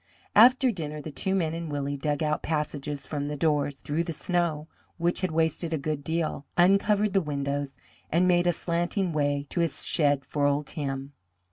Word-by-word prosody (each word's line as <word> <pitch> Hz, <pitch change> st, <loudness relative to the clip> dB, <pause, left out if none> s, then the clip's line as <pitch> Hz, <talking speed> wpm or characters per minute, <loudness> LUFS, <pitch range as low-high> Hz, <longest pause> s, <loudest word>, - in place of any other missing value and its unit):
After 255 Hz, +3 st, +7 dB
dinner 155 Hz, -6 st, -5 dB
the 155 Hz, +1 st, -7 dB
two 190 Hz, +7 st, -1 dB
men 165 Hz, -4 st, 0 dB
and 165 Hz, -2 st, -5 dB
Willie 145 Hz, 0 st, -2 dB
dug 145 Hz, +2 st, -1 dB
out 150 Hz, 0 st, 0 dB
passages 150 Hz, -2 st, -3 dB
from 145 Hz, -2 st, -3 dB
the 150 Hz, 0 st, -4 dB
doors, 145 Hz, -2 st, +1 dB
through 150 Hz, +4 st, -2 dB
the 170 Hz, -1 st, -4 dB
snow, 165 Hz, -2 st, -1 dB, 0.3 s
which 175 Hz, +1 st, 0 dB
had 185 Hz, -, 0 dB
wasted 160 Hz, +1 st, 0 dB
a -, -, +1 dB
good 145 Hz, 0 st, -3 dB
deal, 160 Hz, -3 st, -2 dB
uncovered 200 Hz, +3 st, +4 dB
the 195 Hz, -, +4 dB
windows, 140 Hz, -2 st, -3 dB, 0.3 s
and 175 Hz, +3 st, +3 dB
made 175 Hz, -1 st, +3 dB
a -, -, +5 dB
slanting 175 Hz, +2 st, -1 dB
way 145 Hz, -1 st, 0 dB
to -, -, -2 dB
his 165 Hz, -3 st, 0 dB
shed 145 Hz, -4 st, +1 dB
for 145 Hz, -1 st, +1 dB
old 145 Hz, +1 st, +1 dB
Tim. 135 Hz, -1 st, -4 dB
155 Hz, 190 wpm, -27 LUFS, 145-175 Hz, 0.3 s, After